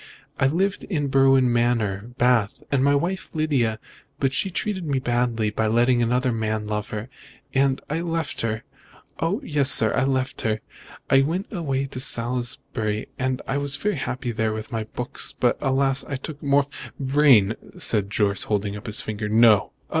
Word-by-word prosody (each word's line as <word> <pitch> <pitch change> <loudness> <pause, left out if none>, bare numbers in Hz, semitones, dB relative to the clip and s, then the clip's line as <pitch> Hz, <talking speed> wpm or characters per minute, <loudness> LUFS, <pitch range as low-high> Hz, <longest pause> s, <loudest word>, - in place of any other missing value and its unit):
"I 135 - +4
lived 190 +7 0
in 145 -7 -2
Berwin 135 -2 +4
Manor, 115 -3 0
Bath, 120 +1 +2
with 140 -2 +2
my 140 +1 +4
wife 180 +6 -2
Lydia, 135 -8 +1 0.4
but 135 -1 +1
she 190 - 0
treated 190 +1 -2
me 145 -4 -1
badly 120 -4 0
by 110 +1 0
letting 120 +2 +3
another 125 +2 +1
man 110 -1 -2
love 105 0 -3
her, 110 +2 -5 0.5
and 135 0 +2
I 155 +3 -2
left 165 -7 -3
her. 110 -1 -2 0.6
Oh, 165 +5 0
yes, 145 -3 +3
sir, 110 -4 +5
I 135 - +2
left 130 -1 -1
her. 110 -1 -1 0.5
I 135 - +5
went 170 +10 -2
away 140 -7 -1
to 130 -1 -6
Salisbury, 120 -4 -2
and 130 0 -1
was 140 0 -2
very 210 0 0
happy 130 -3 -3
there 110 -1 -1
with 110 +4 -6
my 110 -2 -2
books, 125 +3 -2
but, 120 - +3
alas! 135 0 +2
I 135 - -4
took 145 +3 -7
morph 140 0 +2 0.2
" - - -35
"Vrain!" 135 -7 +4 0.2
said 105 -3 +2
Jorce, 100 -1 +1
holding 105 -1 -1
up 105 +3 -9
his 105 +1 0
finger, 105 -1 -4
"no!" 110 -1 +5
125 Hz, 175 wpm, -23 LUFS, 110-140 Hz, 0.6 s, sir